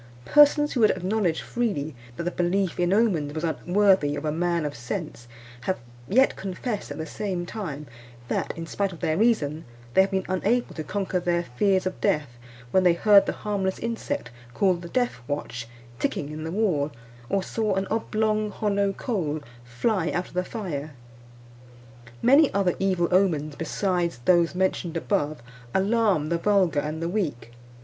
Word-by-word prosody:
Persons 295 0 +5
who 255 - -1
would 215 -2 +6
acknowledge 185 -2 0
freely 195 -11 -2 0.2
that - - -3
the 175 - -1
belief 180 +1 0
in 175 0 +2
omens 190 -9 +2
was 160 - -3
unworthy 175 -2 +2
of 150 - -5
a 150 - +1
man 170 0 0
of 145 - -3
sense, 120 +1 -5 0.4
have 190 - 0 0.3
yet 260 +6 +4
confessed 200 +3 -4
at - - -6
the 160 - -4
same 185 -1 -3
time 160 -8 -5 0.4
that, - - -1
in 165 - -4
spite 195 +4 -1
of 170 - -10
their 155 - 0
reason, 165 -8 +1 0.3
they 190 - +6
have 190 - +2
been 190 -1 -1
unable 210 +6 0
to 155 - -5
conquer 195 0 -1
their 175 -1 0
fears 185 +9 +1
of 185 - -4
death 150 -9 +1 0.4
when 190 - +4
they 180 -2 +5
heard 200 +3 +5
the - - +1
harmless 195 -2 0
insect 230 - -3 0.2
called 185 -3 +2
the 170 - -8
death 245 +2 0
watch 125 -4 -4 0.3
ticking 145 0 -2
in 155 +1 -6
the 160 - -4
wall, 170 -8 +1 0.4
or 195 +3 +1
saw 215 -1 -1
an 195 0 0
oblong 215 -1 0
hollow 200 -1 0
coal 175 - -2 0.2
fly 165 - 0
out 175 +1 -2
of - - -17
the 180 +1 0
fire. 155 - -5 1.3
Many 275 +4 +6
other 195 -3 +2
evil 185 -3 +2
omens 160 -6 +2
besides 175 +1 -1
those 175 -1 +4
mentioned 180 -2 0
above 155 - -1 0.3
alarm 195 -6 +2
the 170 0 0
vulgar 185 -5 +3
and 155 +3 -3
the - - 0
weak. 160 - -2
185 Hz, 170 wpm, -25 LUFS, 160-205 Hz, 1.3 s, would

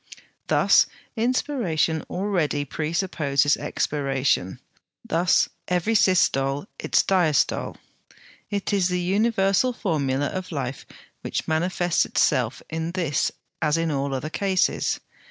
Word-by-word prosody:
Thus - - +4 0.3
inspiration 225 - 0
already 175 -7 -1
presupposes 150 -2 0
expiration; 135 -8 -1 0.5
thus 170 +1 +2 0.2
every 180 +5 0
systole 145 -8 +2
its - - +2
diastole. 175 -7 +1 0.7
It 205 0 -2
is 190 -3 +3
the 180 -1 -1
universal 200 +4 +2
formula 145 - -1
of 185 +4 -4
life 135 -4 -4 0.3
which - - -3
manifests 175 +2 +1
itself 125 -5 +1
in 160 +1 -4
this 165 -7 0 0.3
as 155 0 +2
in 165 -1 0
all 140 -1 -1
other 145 +4 -4
cases. 190 0 0
165 Hz, 105 wpm, -24 LUFS, 145-190 Hz, 0.7 s, Thus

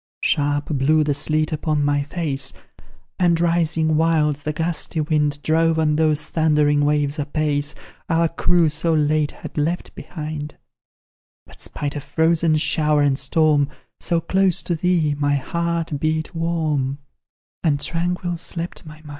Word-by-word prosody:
Sharp 145 -1 +1
blew 155 +2 +2
the 145 -1 +1
sleet 155 +2 0
upon 150 -1 0
my 145 0 +2
face, 145 -3 -3 0.7
And, 170 -2 +3
rising 165 -2 +1
wild, 155 -3 +2
the 150 +1 -4
gusty 165 +1 -2
wind 150 -1 0
Drove 165 +1 +2
on 155 -1 +2
those 155 -1 +2
thundering 150 -2 +2
waves 145 0 +1
apace, 145 0 -1 0.3
Our 165 0 +3
crew 170 +1 +2
so 160 +2 +1
late 150 0 +2
had - - -7
left 165 +4 -2
behind; 155 -2 -7 0.9
But, - - -16
spite 145 0 -4
of 145 - -5
frozen 160 0 +2
shower 150 -1 +2
and 140 -1 +1
storm, 145 0 +2 0.3
So 170 - 0
close 190 +1 +1
to 175 - -1
thee, 165 -3 +1
my 145 0 +2
heart 170 +1 -2
beat 155 +3 -1
warm, 155 -5 -1 0.7
And 145 -3 +2
tranquil 175 +2 -1
slept 170 +1 -5
my 150 - -9
mind. 150 - -12
155 Hz, 145 wpm, -21 LUFS, 145-165 Hz, 0.9 s, And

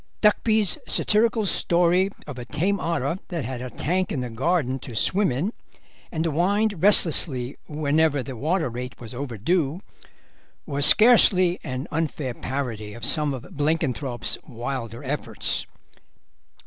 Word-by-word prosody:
Duckby's 215 -1 +2
satirical 220 0 +2
story 175 +1 +2 0.2
of 135 -4 -8
a 120 - -7
tame 180 +10 -1
otter 165 0 -2
that 170 -8 -4
had 125 0 -5
a 130 - -5
tank 180 +9 -2
in 130 - -2
the 125 -1 -5
garden 135 +1 0
to 125 -4 -10
swim 190 - +3
in, 165 - -2 0.6
and 160 0 -2
whined 190 +4 0
restlessly 150 -9 +4
whenever 150 -1 +1
the 130 +1 -7
water 160 +7 -1
rate 125 +1 -7
was 115 -1 -10
overdue, 140 - -1 0.9
was 145 -1 +4
scarcely 185 -6 +6
an 130 +4 -5
unfair 150 -5 -2
parody 115 -6 -5
of 120 -1 -3
some 150 +2 +3
of 130 -3 -6
Blenkinthrope's 145 -4 -1
wilder 120 -1 -6
efforts. 140 +2 -2
150 Hz, 135 wpm, -24 LUFS, 125-180 Hz, 0.9 s, scarcely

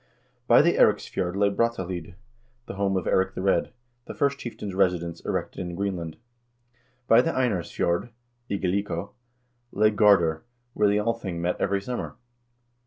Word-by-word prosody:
By 120 +4 +7
the 170 - +2
Eiriksfjord 90 -1 +2
lay 100 0 +2
Brattahlid, 95 -6 -2 0.5
the - - -7
home 95 -1 0
of 90 - -3
Eirik 95 0 +1
the 95 - -4
Red, 95 - +1 0.3
the - - -8
first 140 -1 0
chieftain's 105 -4 -6
residence 90 -3 0
erected - - -3
in 90 -1 -5
Greenland. 90 -5 -3 0.9
By 115 +2 +7
the 165 - -1
Einarsfjord 100 - -1 0.4
(Igaliko) 100 -1 -2 0.6
lay 105 +2 +3
Gardar, 90 -7 +4 0.3
where 105 -3 +2
the 100 +1 +2
Althing 105 -5 -2
met 90 +1 -2
every 100 0 +1
summer. 125 +3 -5
100 Hz, 140 wpm, -26 LUFS, 90-105 Hz, 0.9 s, By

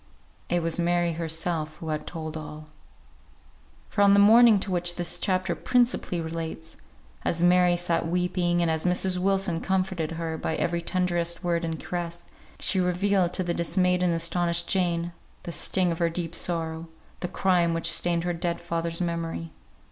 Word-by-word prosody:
It 175 -1 0
was 165 +1 0
Mary 175 0 +1
herself 160 -1 -2
who 160 -1 -7
had 155 -1 -3
told 160 -2 -6
all. 155 0 -8 1.2
For 205 - -1
on 200 0 +6
the - - +5
morning 220 +1 +7
to 195 - -4
which 175 -1 0
this 175 -1 -3
chapter 185 -1 0
principally 240 0 +1
relates, 160 0 -5 0.5
as 170 0 -1
Mary 180 0 +5
sat 170 -1 0
weeping, 175 0 0
and 165 - +1
as 160 0 -1
Mrs. 180 +1 +3
Wilson 190 -2 0
comforted 185 -4 -1
her 165 -1 -4
by 160 - -2
every 170 +1 -1
tenderest 175 -1 -1
word 170 -1 0
and 165 -1 -3
caress, 175 -1 -5 0.3
she 190 - +1
revealed 180 0 +1
to 185 - -1
the 175 -1 -1
dismayed 180 +1 +1
and 175 -2 +2
astonished 170 +1 +1
Jane, 175 -2 0 0.3
the 170 - -6
sting 180 +1 +1
of 165 - -4
her 170 -1 +2
deep 165 0 -4
sorrow; 165 -1 -1 0.3
the - - -3
crime 175 -3 +1
which 165 - +2
stained 170 -1 +1
her 175 0 -1
dead 170 0 -2
father's 170 0 -3
memory. 165 -1 -3
175 Hz, 170 wpm, -26 LUFS, 165-180 Hz, 1.2 s, morning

